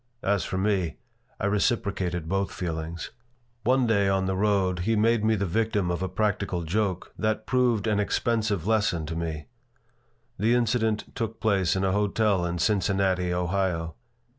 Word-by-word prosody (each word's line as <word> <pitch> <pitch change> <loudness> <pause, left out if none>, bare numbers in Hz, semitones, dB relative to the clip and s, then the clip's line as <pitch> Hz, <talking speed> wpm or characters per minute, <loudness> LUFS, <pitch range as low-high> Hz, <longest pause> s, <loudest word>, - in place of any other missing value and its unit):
As 100 -3 +1
for 95 - -3
me, 95 -5 0 0.4
I - - -1
reciprocated 100 -5 0
both 95 +2 -1
feelings 80 -1 -4 0.5
One 130 +2 +3
day, 100 -4 +2
on 95 -1 +1
the 95 0 -1
road, 95 -2 +1
he 110 +6 +1
made 110 +1 +3
me 110 0 +3
the 100 -1 -1
victim 105 -1 0
of 85 - -2
a 95 - -1
practical 95 -2 -1
joke 95 +2 -2
that 110 0 0
proved 125 -4 +2
an 105 -2 +1
expensive 105 -3 0
lesson 105 -7 +1
to 80 +2 -5
me. 80 -3 -4 0.9
The 115 +4 +3
incident 110 -2 0
took 115 -3 -4
place 100 -5 +2
in 95 - 0
a 95 - +2
hotel 100 -2 +1
in 85 0 -2
Cincinnati, 95 -1 +1
Ohio. 90 -2 -1
100 Hz, 160 wpm, -26 LUFS, 90-110 Hz, 0.9 s, One